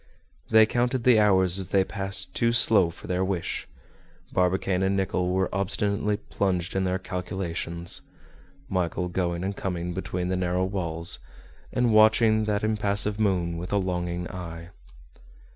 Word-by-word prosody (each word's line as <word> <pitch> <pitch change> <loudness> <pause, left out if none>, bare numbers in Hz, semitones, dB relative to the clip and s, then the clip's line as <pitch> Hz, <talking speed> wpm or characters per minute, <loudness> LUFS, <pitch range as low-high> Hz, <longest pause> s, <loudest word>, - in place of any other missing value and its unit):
They 110 0 +7
counted 120 +2 0
the 120 -3 +6
hours 95 -3 +4
as 95 - -1
they 95 +1 +3
passed 95 -2 -2
too 115 0 +2
slow 110 -6 +4
for 85 - -12
their 90 +1 -1
wish; 95 -2 -3 0.7
Barbicane 90 0 +1
and 95 +1 +1
Nicholl 95 -2 0
were 95 +1 +1
obstinately 100 +2 0
plunged 95 -4 -2
in 95 0 +1
their 90 0 0
calculations, 90 -2 -3 0.7
Michel 90 -3 -1
going 85 -1 -2
and 100 +1 -2
coming 90 -2 -3
between 90 -1 -3
the 95 - 0
narrow 90 0 0
walls, 85 -4 -2 0.5
and 120 -2 +1
watching 110 0 +5
that 105 -1 -1
impassive 105 -1 0
moon 90 -5 0
with 90 - -6
a 100 - +2
longing 90 -2 -2
eye. 85 -2 -7
95 Hz, 145 wpm, -26 LUFS, 90-105 Hz, 0.7 s, They